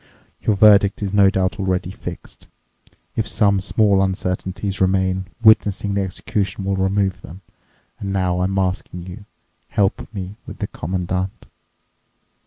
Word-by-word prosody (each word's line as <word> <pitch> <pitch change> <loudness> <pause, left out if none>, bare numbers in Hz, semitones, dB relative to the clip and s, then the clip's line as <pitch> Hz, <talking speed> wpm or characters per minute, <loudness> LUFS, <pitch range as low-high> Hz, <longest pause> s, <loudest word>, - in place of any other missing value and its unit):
Your 105 - +2
verdict 100 0 +5
is 100 -1 -3
no 100 -1 +6
doubt 95 +2 -1
already 95 -2 -1
fixed. - - -9 0.7
If 110 -2 -1
some 100 -1 +2
small 100 0 +3
uncertainties 95 +1 -2
remain, 95 0 +1 0.2
witnessing 105 -2 +4
the 100 - +1
execution 95 +1 -2
will 100 0 0
remove 95 0 0
them. 90 +2 -11 0.6
And 100 - -4
now 90 -2 0
I'm 95 +1 0
asking 90 -2 -2
you—help 100 +1 -4
me 100 -1 -6
with - - -8
the - - -2
Commandant!" 90 +2 -3
95 Hz, 130 wpm, -20 LUFS, 95-100 Hz, 0.7 s, no